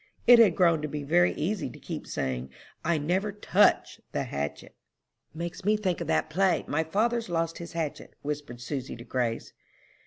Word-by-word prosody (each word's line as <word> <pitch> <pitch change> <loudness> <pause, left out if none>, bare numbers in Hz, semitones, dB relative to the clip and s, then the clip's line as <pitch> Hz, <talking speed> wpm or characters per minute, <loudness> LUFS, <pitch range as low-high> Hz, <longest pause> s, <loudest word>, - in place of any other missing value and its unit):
It 245 -1 +9
had 205 -8 +6
grown 170 -4 +4
to 150 - -2
be 150 0 -5
very 175 +5 +4
easy 190 +6 -2
to - - -12
keep - - -7
saying, 65 0 -3 0.3
I 170 0 +2
never 185 +8 0
touched 205 +1 +2
the - - 0
hatchet.'" 70 +1 -5 0.6
"Makes 170 +3 -6
me 210 +2 +3
think 185 -4 -1
of - - -3
that - - +1
play, 185 +4 +1
'My 160 +2 +1
father's 225 +6 0
lost 165 -1 -1
his 170 -1 -8
hatchet,'" 160 -3 -4
whispered 145 -5 -5
Susy 130 +1 -4
to 120 - -10
Grace. 120 -2 -2
165 Hz, 180 wpm, -28 LUFS, 145-190 Hz, 0.6 s, It